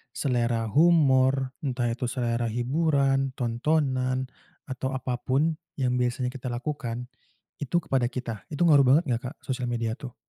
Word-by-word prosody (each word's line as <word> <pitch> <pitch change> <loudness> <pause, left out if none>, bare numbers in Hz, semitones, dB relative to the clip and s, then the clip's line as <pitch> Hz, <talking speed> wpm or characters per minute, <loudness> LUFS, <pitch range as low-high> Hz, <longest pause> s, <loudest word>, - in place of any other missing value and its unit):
selera 120 -4 0
humor, 135 -5 +4
entah 125 -4 -1
itu 120 +1 -3
selera 120 -1 -1
hiburan, 135 +2 +1
tontonan, 130 +1 0 0.4
atau 130 0 -4
apa 125 -1 -3
pun 140 +7 +1 0.2
yang 125 -2 0
biasanya 125 0 -1
kita 130 -1 -7
lakukan, 125 -1 -4 0.5
itu 145 +3 -4
kepada 130 -3 +1
kita? 120 -4 -6
Itu 150 +2 -1
ngaruh 145 -5 +6
banget 145 +6 +5
nggak, 115 - 0
Kak, 140 - -8
sosial 125 -2 -3
media 115 -2 -1
tuh? 130 -5 -8
130 Hz, 145 wpm, -26 LUFS, 120-135 Hz, 0.5 s, ngaruh